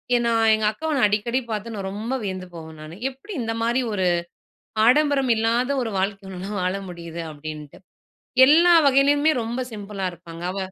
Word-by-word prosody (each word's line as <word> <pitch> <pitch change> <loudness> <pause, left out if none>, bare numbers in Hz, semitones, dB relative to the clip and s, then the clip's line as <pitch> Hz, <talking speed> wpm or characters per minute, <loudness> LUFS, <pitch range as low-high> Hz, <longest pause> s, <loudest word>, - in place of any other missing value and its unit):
ஏன்னா 235 -1 +2 0.2
எங்க 215 0 +1
அக்கா 315 +9 -9
நான் 250 - +4
அடிக்கடி 220 +5 0
பாத்து 220 +2 -4
நான் 195 -1 -4
ரொம்ப 220 +6 -4
வியந்து 185 -2 -4
போவேன் 160 -1 -10
நானு. 155 +2 -9
எப்டி 270 +11 -11
இந்த 225 -1 -2
மாரி 240 +3 +1
ஒரு 190 -2 0 0.8
ஆடம்பரம் 275 -1 +3
இல்லாத 235 +4 +1
ஒரு 230 - -3
வாழ்க்கை 195 +1 -2
உன்னால 190 +3 -6
வாழ 185 +1 0
முடியுது 170 -1 -7
அப்டின்ட்டு. 150 -1 -9 0.7
எல்லா 340 +5 +6
வகையிலேயுமே 285 +3 +4
ரொம்ப 235 +3 -3
சிம்பிளா 200 -2 -5
இருப்பாங்க 170 -1 -11
அவ 195 - -5
215 Hz, 160 wpm, -23 LUFS, 185-255 Hz, 0.8 s, எல்லா